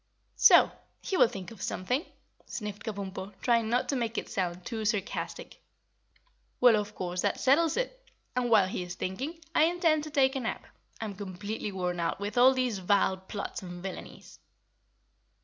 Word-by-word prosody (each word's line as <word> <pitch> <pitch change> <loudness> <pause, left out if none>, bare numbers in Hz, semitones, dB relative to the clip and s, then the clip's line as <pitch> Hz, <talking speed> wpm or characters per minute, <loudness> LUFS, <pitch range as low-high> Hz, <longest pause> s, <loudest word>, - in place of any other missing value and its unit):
"So! - - +7 0.3
He 385 - -2
will 360 - +6
think 195 -1 -7
of 225 - -12
something," 250 - -1 0.4
sniffed 210 -2 -6
Kabumpo, 195 -2 -6
trying 230 -2 +2
not 245 +2 +1
to 280 - +1
make 230 -2 -2
it - - -3
sound 180 -2 -2
too 225 -2 -3
sarcastic. 210 -2 -3 1.0
"Well, 245 -3 +7
of 210 0 -2
course, 180 0 -3
that 200 - 0
settles 315 - +3
it. - - -4 0.3
And 250 -1 +1
while 210 -5 +5
he 185 - -3
is 180 0 -6
thinking, 270 - -4
I 310 - +5
intend 330 -3 +2
to - - -6
take 275 -2 +3
a - - 0
nap. 240 -2 -4 0.3
I'm 220 -2 -4
completely 200 +2 -5
worn 180 -2 -2
out 170 +2 -1
with 205 +1 -4
all 255 +2 +6
these 250 -6 0
vile 190 0 +2
plots 190 +2 -6
and 175 -1 -8
villainies." 190 -1 -8
210 Hz, 170 wpm, -29 LUFS, 190-255 Hz, 1.0 s, So